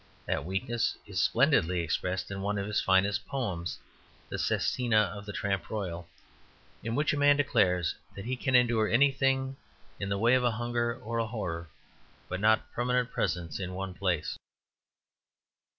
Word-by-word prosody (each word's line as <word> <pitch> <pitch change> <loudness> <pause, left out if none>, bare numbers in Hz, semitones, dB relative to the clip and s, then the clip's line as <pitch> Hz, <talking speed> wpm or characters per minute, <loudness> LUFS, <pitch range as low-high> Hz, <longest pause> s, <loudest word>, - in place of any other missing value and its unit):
That 70 - -1
weakness 100 +6 -1
is 95 -4 -1
splendidly 115 - +3
expressed 90 +4 -2
in 100 0 -4
one 100 +1 -1
of 100 - -2
his 105 0 0
finest 95 +1 +2
poems, 95 - -3 0.5
"The - - -4
Sestina 120 -3 +1 0.2
of 100 0 -9
the - - -4
Tramp 100 -3 -2
Royal," 90 -5 -4 0.7
in 115 +1 -3
which 150 +2 +2
a - - -1
man 145 0 +5
declares 95 - +2 0.2
that 100 - -7
he 130 +2 -1
can 130 0 0
endure 120 -3 +4
anything 135 +1 +2 0.4
in 100 - -3
the 100 - 0
way 115 +4 +4
of 130 - +5
hunger 120 0 0
or 115 +1 -3
horror, 90 -7 -4 0.6
but 95 - -3
not 110 +2 +2
permanent 125 0 0
presence 85 -2 -2
in 90 -1 -4
one 95 0 -4
place. 90 -5 -1
105 Hz, 155 wpm, -30 LUFS, 95-120 Hz, 0.7 s, man